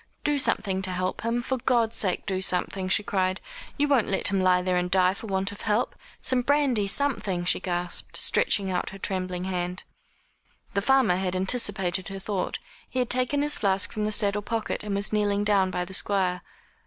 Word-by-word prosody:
"Do 295 -1 +2
something 190 -7 0
to 190 - -1
help 185 0 -2
him 230 +1 -1
for 260 0 -2
God's 230 -2 +1
sake 185 -4 +1
do 190 -2 -1
something," 185 0 -1
she 205 - +4
cried; 190 -2 0 0.4
"you 290 - +2
won't 275 -6 +3
let 195 - +1
him 195 -1 +1
lie 180 -1 +3
there 180 0 0
and 180 0 0
die 185 0 +4
for 220 - -9
want 195 0 -1
of 205 - -11
help. 215 +2 0 0.3
Some 255 -1 +3
brandy 265 -6 +2
something," 195 -7 -1
she - - +3
gasped, 175 -1 -1
stretching 195 -2 +2
out 180 - -1
her 195 - -9
trembling 185 -2 -3
hand. 180 0 -3 0.9
The 200 - +1
farmer 260 -6 +3
had 185 -1 -2
anticipated 190 -3 0
her 195 - -6
thought. 195 -1 -3 0.3
He - - -6
had 250 -2 0
taken 255 +3 +2
his 295 0 +1
flask 195 -1 +1
from 215 -1 -2
the 215 - -1
saddle 205 -1 +1
pocket, 225 0 -3
and 205 -1 -3
was 200 +2 -1
kneeling 205 -1 +1
down 200 -2 +3
by 180 -1 -2
the 190 - -10
Squire. 185 -2 +1
195 Hz, 200 wpm, -26 LUFS, 185-225 Hz, 0.9 s, she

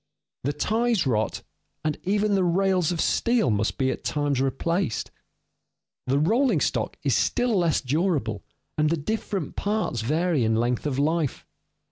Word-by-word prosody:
The 145 - 0
ties 225 +1 +1
rot, 110 -4 0 0.4
and 155 -1 +1
even 205 +2 +1
the 195 -1 +3
rails 180 -1 +2
of 170 - -3
steel 235 - +2
must 105 +1 0
be 130 -1 +1
at - - -6
times 145 -3 0
replaced. 135 - -1 1.0
The 135 +2 +2
rolling 230 - +3
stock - - -1
is - - +2
still 245 -2 +1
less 170 -5 +2
durable, 135 - -1 0.4
and 150 0 +3
the 165 - +1
different 195 0 -3
parts 205 - -1
vary 155 +3 +1
in 110 0 +2
length 120 +4 0
of 135 -3 -2
life. 155 0 0
160 Hz, 150 wpm, -25 LUFS, 130-195 Hz, 1.0 s, the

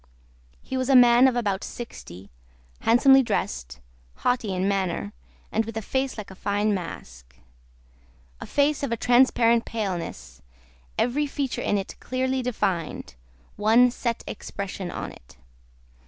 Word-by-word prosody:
He 260 - -4
was 260 0 -1
a 270 - +5
man 245 +1 +7
of 255 - +1
about 205 -5 -1
sixty, 95 - -9 0.5
handsomely 270 +4 +6
dressed, 65 - -3 0.4
haughty 245 -5 0
in 185 +1 0
manner, 190 - -1 0.4
and 220 - +1
with 225 0 -7
a - - -2
face 265 +3 -2
like 210 -2 -7
a - - -11
fine 205 +2 0
mask. 60 - -7 1.0
A - - -8
face 285 +1 +1
of 280 -4 -2
a 230 - 0
transparent 240 -1 +4
paleness; 195 -7 -5 0.6
every 285 +5 +1
feature 275 -2 -3
in 205 - +1
it 195 - -5
clearly 260 0 -1
defined; 190 - -2 0.4
one 225 +4 +5
set 235 -1 -3
expression 195 -3 -6
on - - -5
it. - - -17
225 Hz, 140 wpm, -25 LUFS, 190-250 Hz, 1.0 s, man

